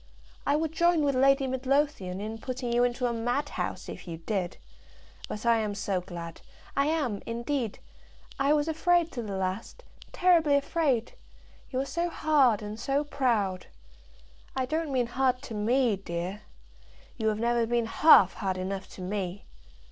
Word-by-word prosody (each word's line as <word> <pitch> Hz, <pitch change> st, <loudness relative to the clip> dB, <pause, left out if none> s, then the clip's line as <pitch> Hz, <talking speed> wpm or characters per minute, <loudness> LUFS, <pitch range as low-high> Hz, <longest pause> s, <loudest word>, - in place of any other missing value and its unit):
"I 285 Hz, -, +4 dB
would 315 Hz, 0 st, 0 dB
join 340 Hz, -1 st, +3 dB
with 280 Hz, -1 st, +2 dB
Lady 275 Hz, +1 st, +4 dB
Midlothian 260 Hz, -7 st, 0 dB
in 220 Hz, +2 st, -5 dB
putting 250 Hz, 0 st, -3 dB
you 240 Hz, +1 st, +4 dB
into 245 Hz, +1 st, 0 dB
a 240 Hz, -, +1 dB
madhouse, 245 Hz, +5 st, -2 dB
if -, -, -8 dB
you 165 Hz, -1 st, -5 dB
did. 180 Hz, +1 st, -3 dB, 0.7 s
But 215 Hz, +2 st, -5 dB
I 235 Hz, -1 st, +5 dB
am 210 Hz, -2 st, -2 dB
so 195 Hz, -2 st, -1 dB
glad; 170 Hz, -2 st, -8 dB, 0.3 s
I 280 Hz, +1 st, +2 dB
am, 290 Hz, -10 st, 0 dB
indeed. 235 Hz, 0 st, -2 dB, 0.6 s
I 275 Hz, +1 st, +3 dB
was 295 Hz, 0 st, +1 dB
afraid 335 Hz, +1 st, +2 dB
to 245 Hz, -, -4 dB
the 200 Hz, -4 st, -4 dB
last, 190 Hz, -, -4 dB, 0.3 s
terribly 335 Hz, -5 st, +4 dB
afraid; 280 Hz, -5 st, 0 dB, 0.6 s
you 255 Hz, -, -2 dB
are 270 Hz, -, 0 dB
so 340 Hz, +4 st, -1 dB
hard 275 Hz, -10 st, +3 dB
and 210 Hz, +1 st, -6 dB
so 275 Hz, +4 st, 0 dB
proud. 235 Hz, -10 st, 0 dB, 0.9 s
I 260 Hz, -1 st, 0 dB
don't 310 Hz, +2 st, -2 dB
mean 255 Hz, -2 st, +2 dB
hard 255 Hz, +1 st, +1 dB
to 245 Hz, -, -7 dB
me, 225 Hz, +1 st, +2 dB
dear. 185 Hz, +2 st, -5 dB, 0.8 s
You 220 Hz, -2 st, -1 dB
have 215 Hz, -1 st, +1 dB
never 235 Hz, 0 st, +1 dB
been 235 Hz, 0 st, +1 dB
half 225 Hz, -, +6 dB
hard 190 Hz, -3 st, -2 dB
enough 190 Hz, +1 st, -4 dB
to -, -, -9 dB
me. 190 Hz, 0 st, -4 dB
240 Hz, 165 wpm, -28 LUFS, 205-280 Hz, 0.9 s, half